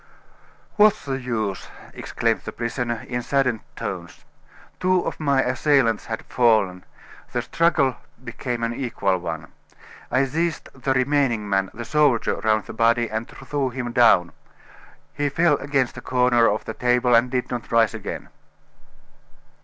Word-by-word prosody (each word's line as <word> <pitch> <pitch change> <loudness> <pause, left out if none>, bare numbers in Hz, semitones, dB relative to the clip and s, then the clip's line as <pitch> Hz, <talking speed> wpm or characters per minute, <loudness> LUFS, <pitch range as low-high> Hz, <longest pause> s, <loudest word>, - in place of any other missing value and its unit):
"What's 215 -3 +4
the 135 -1 -3
use?" 110 -6 -3 0.3
exclaimed - - -1
the - - -4
prisoner, 120 -1 -3
in 120 0 -2
saddened 125 -3 +1 0.2
tones. - - -6 0.5
"Two 185 0 +2
of - - -4
my 140 -3 +2
assailants 130 -3 +2
had 110 -1 -4
fallen; 110 -7 +2 0.5
the - - -1
struggle 160 -6 +2 0.3
became 120 -1 -4
an 115 0 -1
equal 115 -7 -1
one. 85 -1 -6 0.6
I 130 +3 +2
seized 165 +5 -2
the 135 0 -1
remaining 130 -5 +1
man, 95 -1 +1
the 120 +1 -7
soldier, 145 -5 +2
round 110 -1 +1
the - - -8
body, 115 0 +2
and 110 +1 -3
threw 140 -3 -3
him 125 -1 -4
down. 115 -8 +4 0.8
He 145 0 -1
fell 150 +1 +3
against 135 -3 -1
a - - -6
corner 125 -2 +3
of 105 - -2
the 110 - -5
table, 125 0 +2
and 120 +2 +4
did 125 -1 -2
not 120 -2 -5
rise 115 -1 +3
again." 110 -3 -6
125 Hz, 145 wpm, -23 LUFS, 115-135 Hz, 0.8 s, What's